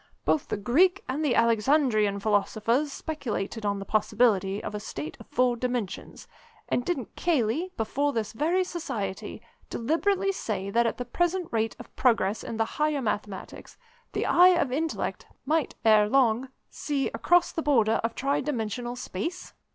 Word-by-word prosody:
Both 300 - +1
the - - -2
Greek 340 - +3
and 275 +5 -2
the 280 -5 +2
Alexandrian 230 -3 +3
philosophers 215 +7 +1
speculated 225 -9 -4
on 200 0 0
the 195 - -6
possibility 215 -2 +2
of - - -5
a 210 - -3
state 155 -7 -6
of - - -13
four 250 -1 +2
dimensions; 245 -5 -4 0.4
and 245 - 0
didn't 275 - -3
Cayley, 320 +2 0
before 280 +6 0
this 220 -5 -3
very 330 +9 +1
Society, 220 - -5 0.3
deliberately 380 +10 +1
say 200 - -3
that 235 +2 +3
at - - -2
the 245 - -4
present 350 +7 -1
rate 225 -1 0
of 245 - -13
progress 225 -5 +2
in 225 - -5
the 225 - +2
Higher 300 +1 -1
Mathematics, 210 -3 -5 0.4
the - - -1
eye 360 +1 +6
of 275 -6 0
Intellect 315 +4 -2 0.2
might 310 +1 0
ere 215 -1 +5
long 255 0 +2 0.2
see 285 -2 -2
across 350 +9 +2
the 325 - -3
border 230 -7 +3
of 230 0 -2
tri 275 +2 0
dimensional 240 -3 -3
space? 250 - -5
240 Hz, 160 wpm, -27 LUFS, 215-300 Hz, 0.4 s, eye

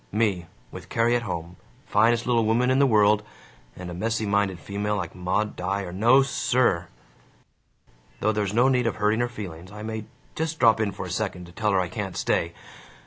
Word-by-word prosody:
Me, 100 -5 0 0.2
with - - -10
Carrie 115 +1 +2
at 120 - +1
home, 85 -4 -5 0.3
finest 115 +3 +3
little 120 -2 +2
woman 120 +4 +2
in 130 - +3
the 140 - +5
world, 105 -2 +4 0.5
and 90 -1 -7
a - - -6
messy 110 +4 -1
minded 100 -2 +1
female 100 +4 -2
like 85 -5 -4
Maud 95 +4 -1
Dyer 95 0 -3
no, 120 +8 +5
SIR! 125 -9 +1 1.3
Though 110 - +2
there's 105 -3 -1
no 120 +4 +4
need 125 -3 +2
of 115 - -1
hurting 105 +1 +1
her 120 0 0
feelings. 95 -6 -8
I 105 0 -8
may 110 -1 -5 0.3
just 160 0 -3
drop 115 -2 +5
in 110 -2 0
for 95 - -6
a - - -6
second, 90 -1 -3
to 85 - -14
tell 105 +4 0
her 95 - +3
I 90 - 0
can't 95 0 -5
stay. 85 0 0
105 Hz, 195 wpm, -25 LUFS, 95-115 Hz, 1.3 s, the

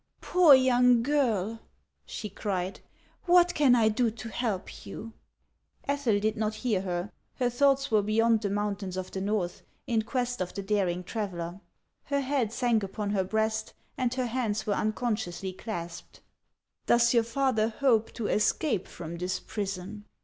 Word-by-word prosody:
" - - -46
Poor 350 -6 +7
young 250 -2 +4
girl 230 -7 0 0.2
" - - -48
she 215 - -5
cried; 190 -2 -3 0.2
" - - -35
what 355 0 +5
can 275 -4 +5
I 225 -2 +4
do 230 +2 +2
to 225 +1 -8
help 215 -5 -3
you 225 +1 -8 0.4
?" - - -35
Ethel 280 -7 +1
did 215 +1 0
not 215 0 -1
hear 215 -4 0
her. 180 +1 -3 0.2
Her 245 -2 0
thoughts 275 +1 +2
were 215 -1 +4
beyond 220 +2 +2
the 205 - -1
mountains 200 -2 -2
of 185 0 -5
the 190 - -4
Xorth, 195 -3 -2 0.2
in 230 -2 +1
quest 245 +1 -2
of 180 - -4
the 200 - -4
daring 190 -3 0
traveller. 180 -3 -4 0.4
Her 280 -1 0
head 260 -5 0
sank 235 -2 +1
upon 200 +1 -3
her 195 -2 +1
breast, 220 +2 -1 0.2
and 255 -2 0
her 255 -1 0
hands 225 -3 -1
were 210 - +1
unconsciously 210 -4 -2
clasped. 175 -4 -7 0.7
"Does 235 0 +4
your 235 - +5
father 235 -2 +1
hope 230 -2 +2
to 230 - -4
escape 210 - +1
from 170 0 -7
this 180 +2 -2
prison?" 200 0 -5
220 Hz, 170 wpm, -28 LUFS, 200-245 Hz, 0.7 s, Poor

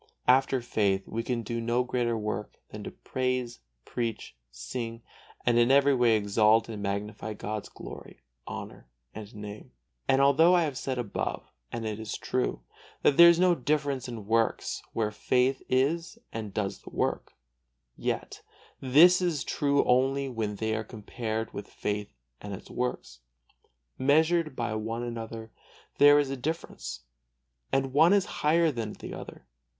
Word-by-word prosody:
After 130 0 +4
faith 100 -4 +1
we 115 - -3
can 115 0 -2
do 115 +2 -3
no 120 +2 +1
greater 120 -2 -1
work 105 -1 -4
than - - -8
to - - -4
praise, 125 -2 -3 0.3
preach, 115 - -4
sing 115 - -6 0.4
and 120 -1 +4
in 120 +1 +4
every 140 +1 +5
way 120 -3 +4
exalt 105 +2 +3
and 110 -3 -6
magnify 105 +2 -3
God's 105 0 -5
glory, - - -11 0.3
honor - - -8 0.2
and 105 -1 -9
Name. 105 0 -8 0.4
And 135 - +4
although 150 +6 +6
I 175 - +4
have 145 -4 -2
said 130 0 -3
above, 120 -5 -3 0.2
and 115 -1 -4
it 110 -1 -3
is 110 -1 -4
true, 125 0 -2 0.4
that 140 - +4
there 170 0 +10
is 170 0 +4
no 180 -1 +5
difference 140 -3 -1
in 115 -4 -7
works 115 +1 0
where 110 -2 0
faith 125 +5 +1
is 165 - +1 0.2
and 110 -2 -5
does 100 -1 -3
the - - -12
work, - - -2 0.6
yet - - -3 0.4
this 165 +8 +6
is 170 -6 0
true 140 -1 +1
only 135 +2 +2
when 110 -5 -3
they 110 +1 -1
are 110 - -2
compared 110 0 -5
with 100 - -6
faith 105 0 -4 0.3
and 100 -1 -5
its 95 - -12
works. 125 - -3 0.8
Measured 155 +2 +3
by 115 -3 -2
one 115 +2 -3
another 115 -1 -6 0.5
there 145 0 +8
is 145 -2 +1
a - - -1
difference, 155 +6 -5 0.7
and 135 -1 0
one 160 +6 +6
is 200 -2 +3 0.2
higher 160 +2 +4
than 115 -5 -4
the - - -8
other. - - -9
120 Hz, 155 wpm, -28 LUFS, 110-140 Hz, 0.8 s, there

